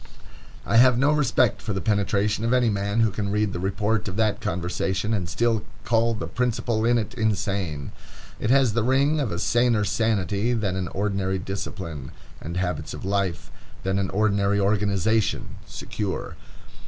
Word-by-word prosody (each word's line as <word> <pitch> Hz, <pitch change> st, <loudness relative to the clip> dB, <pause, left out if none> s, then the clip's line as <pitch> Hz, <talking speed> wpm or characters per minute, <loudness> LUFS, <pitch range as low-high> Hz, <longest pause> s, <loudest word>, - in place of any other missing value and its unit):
I 115 Hz, -, +2 dB
have 125 Hz, 0 st, +6 dB
no 140 Hz, +4 st, +3 dB
respect 130 Hz, -6 st, +2 dB
for 110 Hz, -, -3 dB
the 95 Hz, -, -1 dB
penetration 105 Hz, 0 st, 0 dB
of 115 Hz, +2 st, +1 dB
any 125 Hz, -3 st, +3 dB
man 100 Hz, +2 st, 0 dB
who 110 Hz, -2 st, +3 dB
can 100 Hz, 0 st, -3 dB
read 105 Hz, -1 st, 0 dB
the -, -, -3 dB
report 105 Hz, +3 st, -1 dB
of 95 Hz, -, -4 dB
that 110 Hz, -1 st, +1 dB
conversation, 95 Hz, +4 st, -1 dB
and 90 Hz, -5 st, -1 dB
still 115 Hz, +2 st, +1 dB, 0.2 s
call 115 Hz, 0 st, +2 dB
the 85 Hz, -, -4 dB
principal 115 Hz, +3 st, -1 dB
in 120 Hz, +1 st, +4 dB
it 110 Hz, 0 st, -3 dB
insane. 100 Hz, -, -1 dB, 0.5 s
It 105 Hz, -, -1 dB
has 130 Hz, -3 st, +4 dB
the 120 Hz, -, +1 dB
ring 140 Hz, +6 st, +2 dB
of 135 Hz, -7 st, -1 dB
a 85 Hz, -, -2 dB
saner 120 Hz, +2 st, +2 dB
sanity 110 Hz, +1 st, 0 dB
than 105 Hz, -5 st, -1 dB
an 95 Hz, -2 st, -2 dB
ordinary 95 Hz, 0 st, -1 dB
discipline 90 Hz, -6 st, -6 dB, 0.3 s
and 85 Hz, +3 st, -5 dB
habits 90 Hz, -1 st, -2 dB
of -, -, -8 dB
life, 95 Hz, -4 st, -1 dB, 0.3 s
than 95 Hz, +1 st, 0 dB
an 95 Hz, -, -1 dB
ordinary 100 Hz, -1 st, +1 dB
organization, 100 Hz, +1 st, +1 dB
secure. 100 Hz, -3 st, -4 dB
105 Hz, 165 wpm, -24 LUFS, 95-115 Hz, 0.5 s, have